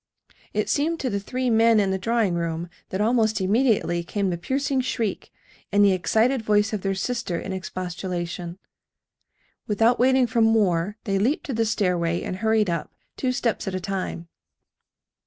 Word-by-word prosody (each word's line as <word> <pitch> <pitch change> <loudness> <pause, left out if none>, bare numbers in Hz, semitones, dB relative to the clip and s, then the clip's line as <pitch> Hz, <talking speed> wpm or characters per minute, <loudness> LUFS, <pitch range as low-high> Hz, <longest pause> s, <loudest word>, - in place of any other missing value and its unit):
It - - -1
seemed 320 +3 0
to 255 - -1
the 200 - -1
three 255 +5 -2
men 225 0 +5
in 195 -2 +1
the 190 - -1
drawing 225 -2 +1
room 170 0 -2 0.2
that 190 - -3
almost 220 -2 +2
immediately 195 -4 +1
came 195 +2 -1
the - - -1
piercing 270 +6 0
shriek, 230 -5 -3 0.4
and 205 0 +5
the 200 - +5
excited 220 +7 +2
voice 210 0 +2
of 210 - -2
their 195 0 -1
sister 195 -3 -2
in 190 - -5
expostulation. 180 -1 -5 1.1
Without 225 +3 +2
waiting 260 +1 +4
for 230 0 0
more 205 -3 +2
they 195 -4 0
leaped 255 +10 0
to 270 - -3
the 225 0 +1
stairway 180 -6 0
and 185 - -4
hurried 220 0 +2
up, 170 -3 -2 0.2
two 255 - -1
steps 245 -5 -1
at 190 - -2
a - - -1
time. 185 -3 -4
205 Hz, 170 wpm, -24 LUFS, 185-230 Hz, 1.1 s, men